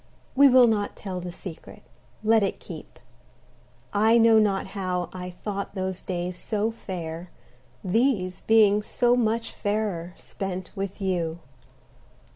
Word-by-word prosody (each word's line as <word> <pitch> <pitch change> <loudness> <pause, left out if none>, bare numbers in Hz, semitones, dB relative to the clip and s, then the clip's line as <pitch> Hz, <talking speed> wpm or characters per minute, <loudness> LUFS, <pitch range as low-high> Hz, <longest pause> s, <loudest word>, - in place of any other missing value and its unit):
We 280 +1 +8
will 255 -1 +7
not 210 -3 0
tell 185 -3 -5
the 175 0 -6
secret 175 -1 -9 0.4
let 220 0 +4
it 195 - -1
keep. - - -10 0.9
I 220 +3 +4
know 225 -1 +6
not 200 -3 +1
how 185 -3 -2
I 180 -1 -6
thought 200 +3 -5
those 190 -1 -3
days 180 0 -4
so 215 0 -1
fair 175 -5 -6 0.5
These 190 -2 +1
being 210 -2 +4
so 240 +3 +2
much 230 -1 0
fairer, 205 -4 -2
spent 185 -2 -6
with 195 0 -5
you. 175 -4 -1
195 Hz, 130 wpm, -26 LUFS, 180-220 Hz, 0.9 s, We